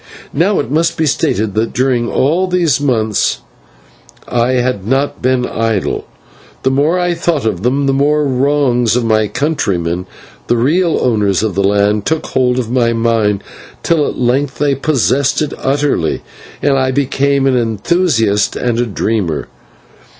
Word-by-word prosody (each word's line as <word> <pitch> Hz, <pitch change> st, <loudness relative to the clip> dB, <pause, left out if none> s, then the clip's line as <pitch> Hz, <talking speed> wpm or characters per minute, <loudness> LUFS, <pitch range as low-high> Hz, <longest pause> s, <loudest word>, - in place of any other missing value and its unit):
Now, 185 Hz, +7 st, +2 dB
it 115 Hz, -, -3 dB
must 165 Hz, +3 st, +1 dB
be 160 Hz, -, +1 dB
stated 110 Hz, -7 st, 0 dB
that 110 Hz, +2 st, -1 dB
during 125 Hz, 0 st, 0 dB
all 165 Hz, +8 st, +1 dB
these 170 Hz, -7 st, +1 dB
months 110 Hz, -7 st, 0 dB, 0.9 s
I 120 Hz, +1 st, +1 dB
had 125 Hz, -6 st, -1 dB
not 135 Hz, +3 st, 0 dB
been 125 Hz, 0 st, +1 dB
idle. 115 Hz, -4 st, -2 dB, 0.6 s
The 130 Hz, -, +2 dB
more 145 Hz, +6 st, +2 dB
I 175 Hz, -1 st, 0 dB
thought 165 Hz, -5 st, -1 dB
on 110 Hz, -, 0 dB
them, 125 Hz, +8 st, 0 dB
the 135 Hz, -, +2 dB
more 150 Hz, +2 st, +2 dB
the 140 Hz, -, -1 dB
wrongs 130 Hz, -3 st, +1 dB
of 125 Hz, -1 st, 0 dB
my 110 Hz, -1 st, +2 dB
countrymen, 90 Hz, -, -2 dB, 0.4 s
the 120 Hz, -, +2 dB
real 165 Hz, +8 st, +2 dB
owners 105 Hz, -5 st, +1 dB
of 110 Hz, -3 st, -1 dB
the 100 Hz, +2 st, 0 dB
land, 105 Hz, +1 st, +1 dB
took 160 Hz, 0 st, -1 dB
hold 125 Hz, -1 st, 0 dB
of 120 Hz, -3 st, -2 dB
my 120 Hz, -2 st, +2 dB
mind, 115 Hz, -3 st, 0 dB, 0.4 s
till 160 Hz, -3 st, +2 dB
at -, -, -5 dB
length 130 Hz, +3 st, 0 dB
they 145 Hz, -1 st, +1 dB
possessed 135 Hz, 0 st, +1 dB
it 150 Hz, -2 st, -2 dB
utterly, 140 Hz, -, 0 dB, 0.4 s
and 135 Hz, -1 st, +2 dB
I 130 Hz, 0 st, +1 dB
became 140 Hz, +1 st, +1 dB
an 135 Hz, -1 st, +2 dB
enthusiast 115 Hz, -, +1 dB
and 120 Hz, -2 st, -1 dB
a 120 Hz, -, 0 dB
dreamer. 100 Hz, -6 st, -2 dB
125 Hz, 160 wpm, -14 LUFS, 110-145 Hz, 0.9 s, Now